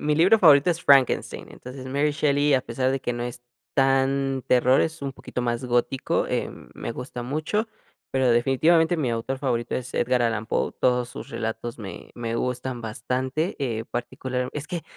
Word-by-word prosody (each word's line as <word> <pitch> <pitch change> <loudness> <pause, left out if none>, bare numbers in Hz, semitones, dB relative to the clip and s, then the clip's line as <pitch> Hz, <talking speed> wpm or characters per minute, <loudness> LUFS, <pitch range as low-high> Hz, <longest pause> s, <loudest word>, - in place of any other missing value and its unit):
mi 150 0 +1
libro 180 +8 +5
favorito 150 -3 +6
es 170 -1 -3
Frankenstein, 135 -3 +3
entonces, 130 +1 -9
Mary 140 +3 +1
Shelley, 145 -1 +2
a 130 - +3
pesar 130 +1 -1
de 135 0 -1
que 120 - -2
no 120 - -4
es 120 0 -5 0.3
tan 135 0 +2
terror, 125 +1 +4
es 160 -2 -2
un 140 -1 -3
poquito 125 - -5
más 120 +1 -1
gótico, 125 +2 0
em, - - -4
me 115 - -5
gusta 125 0 -6
mucho, 155 - -1 0.4
pero 130 -2 +2
definitivamente, 160 +8 +3
mi 140 -6 0
autor 115 +3 -2
favorito 120 -3 -1
es 125 -1 -4
Edgar 125 0 +2
Allan 115 -2 0
Poe. - - -1
Todos 125 -1 +2
sus - - -9
relatos 115 +1 -4
me 100 -4 -8
me 115 -1 -4
gustan 125 0 -2
bastante, 130 - -2
eh, 115 -5 -2
particular 125 +2 -4
es 150 0 -5
que, 175 -2 -4
130 Hz, 180 wpm, -25 LUFS, 120-140 Hz, 0.4 s, favorito